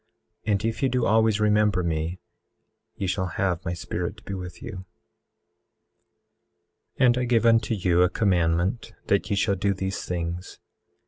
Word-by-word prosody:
And 105 Hz, 0 st, +1 dB
if 115 Hz, 0 st, -2 dB
ye 135 Hz, -, +3 dB
do 125 Hz, -1 st, +1 dB
always 110 Hz, -1 st, +3 dB
remember 105 Hz, -3 st, +3 dB
me 80 Hz, +1 st, -2 dB, 0.8 s
ye 100 Hz, -, -3 dB
shall 95 Hz, 0 st, -1 dB
have 90 Hz, -3 st, 0 dB
my 85 Hz, -, -2 dB
Spirit 85 Hz, +2 st, -4 dB
to 105 Hz, -, -16 dB
be 100 Hz, -, -6 dB
with 90 Hz, -2 st, -7 dB
you. 95 Hz, -5 st, -8 dB, 2.1 s
18:12 -, -, +5 dB
And 120 Hz, 0 st, +4 dB
I 125 Hz, -, 0 dB
give 115 Hz, -1 st, +2 dB
unto 115 Hz, 0 st, +3 dB
you 90 Hz, -3 st, +2 dB
a 90 Hz, -, +5 dB
commandment 90 Hz, +3 st, 0 dB, 0.2 s
that 100 Hz, +1 st, +2 dB
ye 100 Hz, -, +1 dB
shall 100 Hz, +1 st, +2 dB
do 100 Hz, +1 st, 0 dB
these 95 Hz, 0 st, -3 dB
things. 85 Hz, 0 st, -4 dB
95 Hz, 165 wpm, -25 LUFS, 90-110 Hz, 2.1 s, 18:12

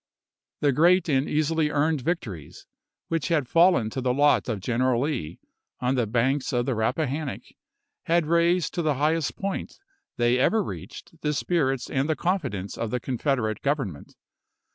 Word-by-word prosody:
The 145 Hz, -, +3 dB
great 175 Hz, +7 st, +4 dB
and 135 Hz, -1 st, +1 dB
easily 155 Hz, 0 st, +1 dB
earned 150 Hz, 0 st, +1 dB
victories 110 Hz, -, -4 dB, 0.4 s
which 165 Hz, -3 st, -1 dB
had 155 Hz, -7 st, +1 dB
fallen 165 Hz, -8 st, +4 dB
to 130 Hz, -, -3 dB
the 125 Hz, 0 st, 0 dB
lot 145 Hz, -2 st, +3 dB
of 110 Hz, -4 st, -2 dB
General 120 Hz, +4 st, +1 dB
Lee 105 Hz, -, -3 dB, 0.4 s
on 125 Hz, +1 st, 0 dB
the 120 Hz, -4 st, 0 dB
banks 130 Hz, +5 st, 0 dB
of 120 Hz, -1 st, 0 dB
the 130 Hz, -, 0 dB
Rappahannock 130 Hz, +6 st, -2 dB, 0.6 s
had 170 Hz, -1 st, +2 dB
raised 170 Hz, -1 st, +2 dB
to 175 Hz, -, -1 dB
the 155 Hz, -3 st, +1 dB
highest 155 Hz, +2 st, 0 dB
point 195 Hz, 0 st, -4 dB, 0.4 s
they 120 Hz, +1 st, +2 dB
ever 215 Hz, +10 st, +3 dB
reached 165 Hz, -2 st, -9 dB
the 150 Hz, 0 st, 0 dB
spirits 135 Hz, -5 st, 0 dB
and 135 Hz, +3 st, -1 dB
the 155 Hz, -, +2 dB
confidence 140 Hz, -, -2 dB
of 115 Hz, -, -2 dB
the 125 Hz, -, -1 dB
Confederate 120 Hz, -3 st, -1 dB
Government. 135 Hz, -, -3 dB
140 Hz, 160 wpm, -25 LUFS, 125-160 Hz, 0.6 s, great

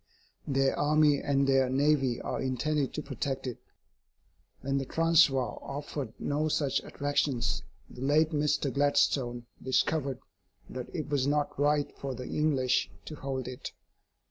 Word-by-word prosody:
Their 135 Hz, -1 st, +2 dB
army 150 Hz, -1 st, +4 dB
and 140 Hz, -1 st, +2 dB
their 135 Hz, -1 st, +3 dB
navy 135 Hz, -2 st, +2 dB
are -, -, -3 dB
intended 135 Hz, +2 st, 0 dB
to 150 Hz, -, -3 dB
protect 135 Hz, 0 st, -3 dB
it. 125 Hz, -2 st, -5 dB, 1.0 s
When 135 Hz, 0 st, 0 dB
the 135 Hz, -, -3 dB
Transvaal 155 Hz, -5 st, +3 dB
offered 140 Hz, -3 st, -5 dB
no 150 Hz, +2 st, -1 dB
such 140 Hz, -3 st, +1 dB
attractions, 145 Hz, -3 st, -1 dB, 0.3 s
the 125 Hz, -, -12 dB
late 150 Hz, +4 st, +3 dB
Mr. 150 Hz, -2 st, +1 dB
Gladstone 140 Hz, -4 st, +2 dB, 0.2 s
discovered 135 Hz, +1 st, 0 dB, 0.5 s
that 125 Hz, -1 st, -6 dB
it 155 Hz, -4 st, -4 dB
was 140 Hz, -2 st, +1 dB
not 145 Hz, 0 st, +1 dB
right 145 Hz, 0 st, +1 dB
for 135 Hz, -2 st, -4 dB
the 125 Hz, +1 st, -6 dB
English 135 Hz, -5 st, +1 dB, 0.2 s
to -, -, -7 dB
hold 135 Hz, -3 st, -4 dB
it. 125 Hz, -1 st, -7 dB
140 Hz, 140 wpm, -30 LUFS, 130-150 Hz, 1.0 s, army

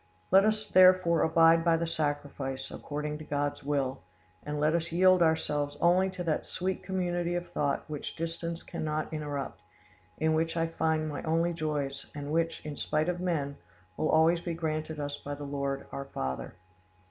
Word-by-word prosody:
Let 195 Hz, +2 st, +7 dB
us 215 Hz, 0 st, 0 dB
therefore 185 Hz, -3 st, +6 dB
abide 165 Hz, 0 st, +5 dB
by 165 Hz, -1 st, +4 dB
the 170 Hz, -, -1 dB
sacrifice, 145 Hz, -4 st, -3 dB
according 150 Hz, +1 st, -4 dB
to -, -, -7 dB
God's 145 Hz, -1 st, -2 dB
will, 140 Hz, -2 st, -1 dB, 0.4 s
and 150 Hz, 0 st, -4 dB
let 155 Hz, +1 st, +3 dB
us 170 Hz, 0 st, -1 dB
yield 185 Hz, +1 st, +5 dB
ourselves 150 Hz, -3 st, +1 dB
only 180 Hz, +3 st, +4 dB
to 185 Hz, -1 st, -5 dB
that 160 Hz, -3 st, -1 dB
sweet 185 Hz, +1 st, -2 dB
community 175 Hz, -2 st, -1 dB
of 175 Hz, 0 st, -4 dB
thought 140 Hz, -2 st, -1 dB
which 150 Hz, -2 st, -5 dB
distance 165 Hz, +1 st, -4 dB
cannot 155 Hz, 0 st, -3 dB
interrupt, 145 Hz, -, -4 dB, 0.6 s
in 160 Hz, 0 st, +2 dB
which 165 Hz, +1 st, 0 dB
I 165 Hz, -, +2 dB
find 160 Hz, -1 st, 0 dB
my 150 Hz, -, -4 dB
only 165 Hz, +2 st, +1 dB
joys, 150 Hz, -4 st, -3 dB
and 145 Hz, 0 st, -5 dB
which, 165 Hz, 0 st, 0 dB
in 150 Hz, -2 st, -5 dB
spite 155 Hz, +3 st, 0 dB
of 175 Hz, 0 st, -2 dB
men, 150 Hz, -6 st, -1 dB, 0.4 s
will 155 Hz, -, 0 dB
always 165 Hz, +2 st, +4 dB
be 170 Hz, -2 st, -3 dB
granted 155 Hz, -1 st, -3 dB
us 145 Hz, 0 st, -3 dB
by 145 Hz, 0 st, -6 dB
the 145 Hz, -, -8 dB
Lord, 140 Hz, -1 st, -3 dB
our 140 Hz, -, -5 dB
Father. 65 Hz, -, -4 dB
160 Hz, 175 wpm, -30 LUFS, 145-170 Hz, 0.6 s, Let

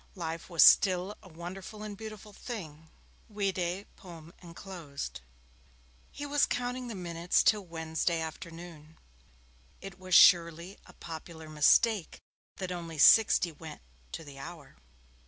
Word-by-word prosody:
Life 165 Hz, -2 st, -6 dB
was 170 Hz, -2 st, +5 dB
still 185 Hz, +1 st, +5 dB
a 185 Hz, -, -15 dB
wonderful 185 Hz, +5 st, -9 dB
and 210 Hz, -1 st, -7 dB
beautiful 215 Hz, 0 st, -10 dB
thing 160 Hz, -, -8 dB, 0.4 s
vide 195 Hz, -2 st, -2 dB
poem 170 Hz, -3 st, -13 dB
enclosed. 170 Hz, -, -8 dB, 0.9 s
He 290 Hz, -, -7 dB
was 290 Hz, 0 st, +2 dB
counting 250 Hz, 0 st, -3 dB
the 230 Hz, -, -6 dB
minutes 175 Hz, -1 st, 0 dB
till 210 Hz, -2 st, +3 dB
Wednesday 165 Hz, 0 st, -2 dB
afternoon. 160 Hz, -1 st, -9 dB, 0.8 s
It 195 Hz, -1 st, -10 dB
was 185 Hz, -2 st, 0 dB
surely 170 Hz, +2 st, +5 dB
a -, -, -15 dB
popular 160 Hz, -1 st, -10 dB
mistake 165 Hz, +6 st, +2 dB, 0.4 s
that 185 Hz, -1 st, -5 dB
only 170 Hz, -2 st, -6 dB
sixty 180 Hz, +2 st, +6 dB
went 155 Hz, -, -11 dB, 0.3 s
to 165 Hz, -, -6 dB
the 140 Hz, -2 st, -12 dB
hour. 160 Hz, 0 st, -10 dB
175 Hz, 125 wpm, -30 LUFS, 160-195 Hz, 0.9 s, sixty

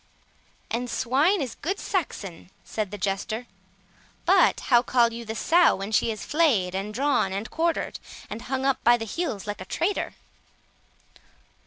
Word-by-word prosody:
"And 245 Hz, +2 st, -2 dB
swine 290 Hz, -, +2 dB
is 245 Hz, -4 st, -5 dB
good 380 Hz, +6 st, -3 dB
Saxon," 200 Hz, -, -3 dB
said 215 Hz, -3 st, -3 dB
the 205 Hz, -, -6 dB
Jester; 205 Hz, +4 st, -2 dB, 0.8 s
"but -, -, +4 dB
how 240 Hz, -2 st, +4 dB
call 240 Hz, -2 st, +3 dB
you 235 Hz, 0 st, -7 dB
the 220 Hz, 0 st, -5 dB
sow 340 Hz, +9 st, +4 dB
when 195 Hz, +2 st, -5 dB
she 220 Hz, +2 st, +2 dB
is 215 Hz, -, -6 dB
flayed, 255 Hz, -, +2 dB
and 195 Hz, +2 st, -3 dB
drawn, 255 Hz, -4 st, +1 dB
and 200 Hz, +4 st, -3 dB
quartered, 335 Hz, 0 st, -1 dB, 0.3 s
and 215 Hz, +2 st, -6 dB
hung 265 Hz, +2 st, -2 dB
up 270 Hz, -1 st, +1 dB
by 240 Hz, +1 st, +6 dB
the 225 Hz, -, -5 dB
heels, 225 Hz, -, -3 dB
like 205 Hz, -2 st, -5 dB
a -, -, -6 dB
traitor?" 360 Hz, -, -1 dB
235 Hz, 160 wpm, -26 LUFS, 205-285 Hz, 0.8 s, by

